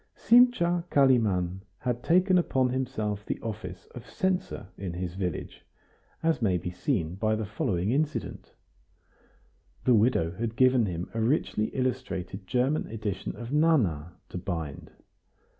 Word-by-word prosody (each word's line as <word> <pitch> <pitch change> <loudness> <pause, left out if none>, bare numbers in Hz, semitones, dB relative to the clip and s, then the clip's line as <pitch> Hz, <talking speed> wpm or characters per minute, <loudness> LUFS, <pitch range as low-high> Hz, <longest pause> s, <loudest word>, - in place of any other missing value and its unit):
Simcha 230 -8 +4
Kalimann 105 - +3 0.2
had 120 -1 -2
taken 180 +5 +4
upon 130 -6 +1
himself 110 -6 -2
the - - -4
office 100 -4 -6
of 120 - -10
censor 185 - -2
in 95 -3 -5
his 90 0 -4
village, 90 -4 -4 0.6
as 165 -4 +1
may 95 -5 +2
be 90 +1 -5
seen 90 - -1
by 110 +3 0
the 110 0 -3
following 100 -2 -1
incident. 150 +3 -2 1.3
The 125 - +5
widow 105 -7 +3
had 115 +5 -4
given 130 -3 +4
him 85 -1 -4
a 115 - -1
richly 115 -3 +1
illustrated 110 -8 -3
German 130 +7 +1
edition 105 -4 -4
of 120 +1 -7
"Nana" 110 - +2 0.2
to 90 - -5
bind. 85 -6 -5
110 Hz, 135 wpm, -28 LUFS, 95-130 Hz, 1.3 s, The